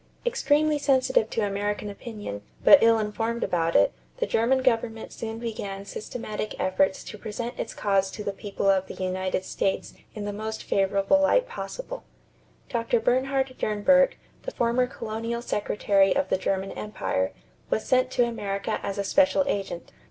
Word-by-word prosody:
Extremely 305 -10 +2
sensitive 260 -5 +2
to 220 - 0
American 205 +1 -2
opinion, 205 - -7 0.2
but 290 - +9
ill 230 0 +6
informed 225 +2 -2
about 165 -1 0
it, 100 - +5 0.2
the - - 0
German 260 +4 +2
government 225 -2 0
soon 225 -1 -5
began 205 -4 -5
systematic 215 +1 -5
efforts 190 +1 +1
to 210 - -9
present 230 +3 -4
its - - -4
cause 195 -2 +1
to 210 - -7
the 200 - -1
people 200 0 -3
of 190 -1 +3
the - - -8
United 185 0 -2
States 195 - -1 0.2
in 210 -1 -4
the 205 - -3
most 220 +1 -5
favorable 195 +7 +2
light - - +3
possible. - - -6 0.6
Dr. 235 -1 +1
Bernhard 265 +3 +1
Dernburg, 270 +7 +4 0.3
the - - -4
former 240 - +1
colonial 230 0 -4
secretary 200 -3 +2
of 280 0 0
the - - +2
German 190 0 -1
empire, 95 - -2 0.4
was 220 - 0
sent 255 -1 +3
to 245 -1 +2
America 200 -4 -3
as 200 - -4
a 200 - 0
special 285 +6 +3
agent. 195 -9 -3
220 Hz, 160 wpm, -26 LUFS, 195-250 Hz, 0.6 s, but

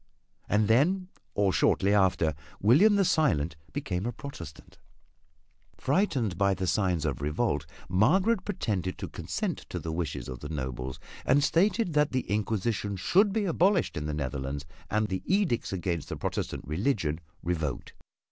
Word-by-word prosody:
And 105 0 +3
then, 180 - +3 0.3
or 100 -2 +2
shortly 100 +2 +3
after, 95 -6 +3 0.3
William 155 - +6
the 200 -1 +3
Silent 95 - +2 0.2
became 90 +5 -2
a - - -1
Protestant. 115 - -10 1.0
Frightened 130 - 0
by 100 -1 +3
the 95 +1 -2
signs 90 -4 +1
of 70 -4 -2
revolt 75 - 0 0.2
Margaret 185 - +3
pretended 105 - -2
to - - -5
consent - - -3
to - - -4
the 80 - -4
wishes 75 -6 -3
of 65 -1 -6
the 75 - -7
nobles 65 -3 -4 0.2
and 140 +2 +3
stated 190 +3 +2
that 150 -1 +2
the 130 - +2
Inquisition 105 0 -1
should 195 - +3
be 210 0 0
abolished 185 - +2
in 75 -2 -3
the 75 - -2
Netherlands 70 0 -3 0.2
and 110 0 +1
the 95 -1 -3
edicts 190 - +1
against 90 -4 -2
the - - -4
Protestant - - -3
religion 80 - 0 0.2
revoked. 80 -6 -2
100 Hz, 150 wpm, -28 LUFS, -, 1.0 s, William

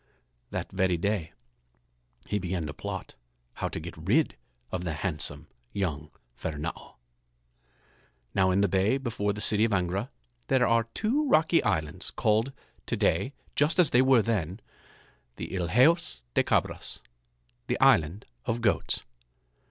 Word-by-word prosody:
That - - -4
very 95 -2 +1
day 95 -2 -1 0.9
he 105 - -1
began 90 -3 -2
to 75 - -5
plot - - -6 0.4
how - - -3
to - - -4
get 85 +2 -7
rid 105 - +1 0.4
of 90 -1 -2
the 85 -3 -2
handsome 75 -3 -2 0.3
young 75 -6 -2 0.3
Fernâo. 80 +4 -5 1.4
Now 95 -1 +3
in 95 +2 +3
the 100 - +4
bay 100 +7 +2
before 110 -6 -1
the 105 +1 -5
city 105 0 +3
of 115 - +3
Angra 95 +5 0 0.4
there 130 -2 +4
are 115 -1 +3
two 270 +7 +1
rocky 165 -3 +4
islands 80 -2 -1
called 110 +5 +1 0.4
to - - -1
day 140 - +1 0.2
just 150 +4 +2
as 175 -6 +5
they 125 - +6
were 130 -4 +5
then, 100 -4 -1 0.8
the - - -6
Ilheos 125 - +3
de - - +3
Cabras, - - -1 0.7
the - - -1
islands 85 +6 +4 0.2
of 115 +1 -1
goats. 105 -4 +1
100 Hz, 140 wpm, -28 LUFS, 85-125 Hz, 1.4 s, they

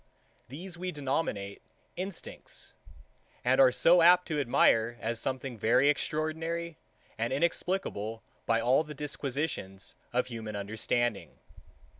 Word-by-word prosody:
These 170 +7 -7
we 185 0 -3
denominate 135 - -2 0.3
Instincts, 185 0 -7 0.7
and 130 +2 +5
are 130 -1 +7
so 170 +7 +5
apt 180 +2 +6
to 155 -2 0
admire 120 -3 +3
as 115 +1 -2
something 130 -1 -3
very 125 +7 +4
extraordinary, 160 +2 -2 0.4
and 115 +2 0
inexplicable 135 - -1 0.2
by 115 0 +3
all 125 +6 +3
the 150 -1 -9
disquisitions 140 -8 -4 0.2
of 125 +1 +1
human 115 -4 -6
understanding. 110 +2 -1
135 Hz, 115 wpm, -30 LUFS, 115-160 Hz, 0.7 s, are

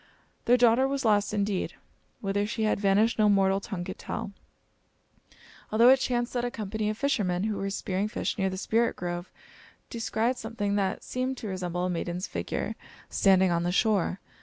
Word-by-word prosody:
Their 245 +1 +5
daughter 245 +2 +4
was 275 -1 -2
lost 205 -2 +3
indeed. 200 -2 -1 0.5
Whither 205 +1 0
she 220 0 -2
had 215 - +1
vanished 205 +3 +2
no 210 -1 +5
mortal 195 -1 +3
tongue 195 -3 -5
could - - -7
tell; 200 - -5 1.4
although 230 +3 +6
it 265 0 +7
chanced 240 -2 -1
that 245 -1 -1
a 245 - 0
company 215 -2 -3
of 215 - -3
fishermen, 200 -10 0
who 215 -1 -1
were 195 0 -2
spearing 195 0 -2
fish 215 - -2
near 195 -3 0
the 190 - -5
Spirit 230 +4 +1
Grove, 175 0 -5 0.6
descried 230 +1 -1
something 220 -3 -3
that 195 -2 -1
seemed 255 +1 -2
to 220 - -6
resemble 180 -2 -2
a - - -1
maiden's 175 +2 -3
figure - - -3 0.4
standing 190 -2 +4
on 170 0 +1
the 175 +1 0
shore. 200 -2 +1
205 Hz, 180 wpm, -28 LUFS, 190-230 Hz, 1.4 s, it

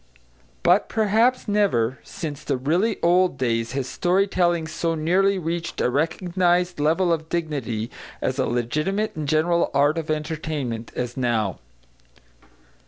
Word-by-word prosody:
But 180 +4 +4
perhaps 225 +4 +2
never, 160 - +1
since 150 -3 -6
the 140 -3 -1
really 175 - +1
old 175 -2 +3
days, 115 -3 -1
has 135 -1 -2
story 185 +6 +1
telling 175 -4 +1
so 165 +1 -2
nearly 190 +5 +2
reached 170 -1 -3
a 125 - +1
recognised 175 +3 +1
level 170 +4 +2
of 160 -1 -4
dignity 135 -9 -3 0.3
as 130 - -2
a 130 - +1
legitimate 155 - -1
and 155 -2 -4
general 165 +3 +2
art 145 +3 +3
of 155 - -6
entertainment 150 -6 -3
as 120 -1 -3
now. 115 -5 0
160 Hz, 135 wpm, -23 LUFS, 135-180 Hz, 0.3 s, But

